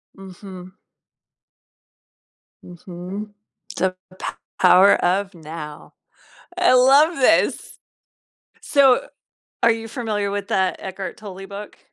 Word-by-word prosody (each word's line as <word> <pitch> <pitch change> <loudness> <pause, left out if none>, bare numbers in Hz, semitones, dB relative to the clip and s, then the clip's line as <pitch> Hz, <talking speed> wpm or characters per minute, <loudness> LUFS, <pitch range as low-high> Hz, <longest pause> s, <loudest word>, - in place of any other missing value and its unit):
Mhm. 185 -1 -11 1.9
Mhm. 180 +4 -8 0.4
The 185 0 -1 0.2
P - - -6 0.4
Power 185 +2 +7
of 195 +3 0
Now. 155 -2 -10 0.7
I 360 -4 +4
love 275 +6 +5
this. 275 +4 +1 0.8
So, 270 -3 +3 0.5
are 230 - +5
you 225 0 -3
familiar 215 -4 -3
with 200 +1 -4
that 190 -4 0
Eckhart 190 0 -6
Tolle 195 -2 -10
book? 200 +1 -10
200 Hz, 95 wpm, -21 LUFS, 185-225 Hz, 1.9 s, Power